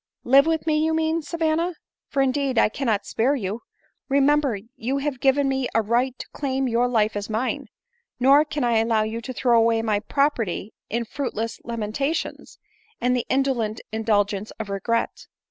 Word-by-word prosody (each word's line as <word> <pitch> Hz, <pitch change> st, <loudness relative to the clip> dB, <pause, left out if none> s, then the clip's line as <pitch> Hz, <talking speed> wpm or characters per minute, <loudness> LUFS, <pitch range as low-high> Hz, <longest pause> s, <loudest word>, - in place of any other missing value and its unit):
" -, -, -60 dB
Live 275 Hz, +3 st, +8 dB
with 325 Hz, -1 st, 0 dB
me, 310 Hz, -1 st, +2 dB
you 320 Hz, 0 st, +1 dB
mean, 320 Hz, +1 st, +1 dB
Savanna; 330 Hz, +2 st, -1 dB, 0.3 s
for 275 Hz, -, +1 dB
indeed, 270 Hz, -1 st, 0 dB
1 215 Hz, -, +4 dB
cannot 220 Hz, -7 st, -1 dB
spare 260 Hz, +6 st, +1 dB
you. 215 Hz, -2 st, -3 dB, 0.5 s
Remember, 280 Hz, -3 st, +3 dB, 0.2 s
you 260 Hz, +5 st, -2 dB
have 275 Hz, -2 st, -2 dB
given 275 Hz, +1 st, +3 dB
me 265 Hz, -1 st, 0 dB
a 225 Hz, -, +3 dB
right 245 Hz, +4 st, 0 dB
to -, -, -8 dB
claim 270 Hz, -2 st, -2 dB
your 240 Hz, +1 st, +2 dB
life 220 Hz, -3 st, +1 dB
as 205 Hz, +1 st, -4 dB
mine; 220 Hz, +4 st, -2 dB, 0.5 s
nor 275 Hz, +4 st, +6 dB
can 295 Hz, -2 st, -3 dB
I 235 Hz, -2 st, +3 dB
allow 225 Hz, -1 st, +2 dB
you 220 Hz, +2 st, -4 dB
to 245 Hz, -, -6 dB
throw 240 Hz, -2 st, +3 dB
away 225 Hz, 0 st, +2 dB
my 215 Hz, -2 st, +1 dB
property 225 Hz, -5 st, -1 dB, 0.2 s
in 235 Hz, +2 st, -1 dB
fruitless 230 Hz, -2 st, -4 dB
lamentations, 235 Hz, -, -3 dB, 0.4 s
and 250 Hz, +1 st, +2 dB
the 245 Hz, -, -2 dB
indolent 255 Hz, -5 st, 0 dB
indulgence 210 Hz, -2 st, 0 dB
of 210 Hz, -2 st, -5 dB
regret. 230 Hz, +4 st, -2 dB
245 Hz, 175 wpm, -24 LUFS, 225-280 Hz, 0.5 s, Live